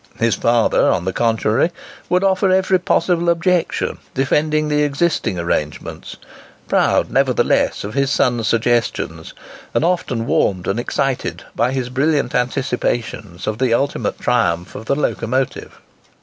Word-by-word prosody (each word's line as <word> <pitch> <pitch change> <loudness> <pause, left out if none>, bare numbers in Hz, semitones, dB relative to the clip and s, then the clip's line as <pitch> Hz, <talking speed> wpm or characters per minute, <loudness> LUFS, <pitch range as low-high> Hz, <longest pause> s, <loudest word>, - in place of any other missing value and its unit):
His 115 -1 +2
father, 115 +3 +2
on 90 -2 0
the 95 - -1
contrary, 115 - +1 0.4
would 180 +1 +2
offer 190 0 +2
every 185 0 +3
possible 175 -1 +1
objection, 170 +1 0 0.2
defending 150 +3 +1
the 150 0 +1
existing 145 - 0
arrangements,—proud, 75 -3 -2
nevertheless - - +1
of 105 +1 -6
his 140 0 +1
son's 120 -5 +1
suggestions, 120 +1 -1 0.4
and - - +2
often 130 -10 -1
warmed 95 -5 +1
and 100 +4 0
excited 135 +1 -2
by 120 +2 +1
his 130 -2 -2
brilliant 140 0 0
anticipations 120 -7 -2
of 110 +1 -3
the 125 -3 +3
ultimate 140 +3 -1
triumph 90 -9 0
of 110 - -8
the 140 - +2
locomotive. 130 -2 -2
125 Hz, 130 wpm, -19 LUFS, 115-150 Hz, 0.4 s, every